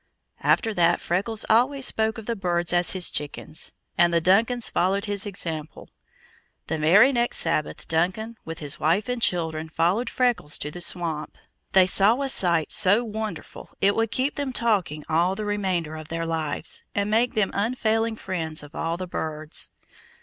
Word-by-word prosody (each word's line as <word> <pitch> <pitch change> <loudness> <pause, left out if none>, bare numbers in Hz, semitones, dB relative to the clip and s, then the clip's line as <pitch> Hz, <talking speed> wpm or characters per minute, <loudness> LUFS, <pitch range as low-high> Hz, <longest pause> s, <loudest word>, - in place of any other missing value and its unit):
After 225 -2 +2
that 175 -2 +3
Freckles 205 +5 -2
always 255 +4 +3
spoke 220 0 +1
of 225 - -8
the 235 - -2
birds 175 -3 0
as 175 0 +3
his 185 -2 0
chickens, 150 +1 -3 0.3
and 175 0 +5
the 170 - +3
Duncans 220 +8 +2
followed 195 +4 0
his 205 -1 -2
example. 160 -5 -5 0.7
The 160 0 -3
very 195 - +6
next 240 -1 0
Sabbath, 160 -2 -2
Duncan, 185 +8 -1
with 165 0 -7
his 145 -3 -2
wife 175 +7 +1
and 250 -1 -3
children, 160 -5 -1
followed 180 +10 +1
Freckles 245 - 0
to 150 - -5
the 175 - -7
swamp. 165 -4 -1 0.4
They 190 -1 +7
saw 200 +6 +4
a 275 - -1
sight 170 -9 +2
so 200 +6 +4
wonderful 220 -1 -7
it 200 +1 +4
will 225 +1 +1
keep 260 +7 -1
them 285 -2 -2
talking 195 -11 0
all 175 +4 +2
the 215 +1 -4
remainder 185 -6 -1
of 155 -1 -8
their 165 +1 -3
lives, 160 -1 -2
and 205 +1 0
make 235 +3 +2
them 210 -3 +1
unfailing 225 +1 0
friends 165 -7 -4
of 145 +1 -13
all 165 +1 -2
the 185 - -4
birds. 155 -2 -3
185 Hz, 170 wpm, -24 LUFS, 165-220 Hz, 0.7 s, They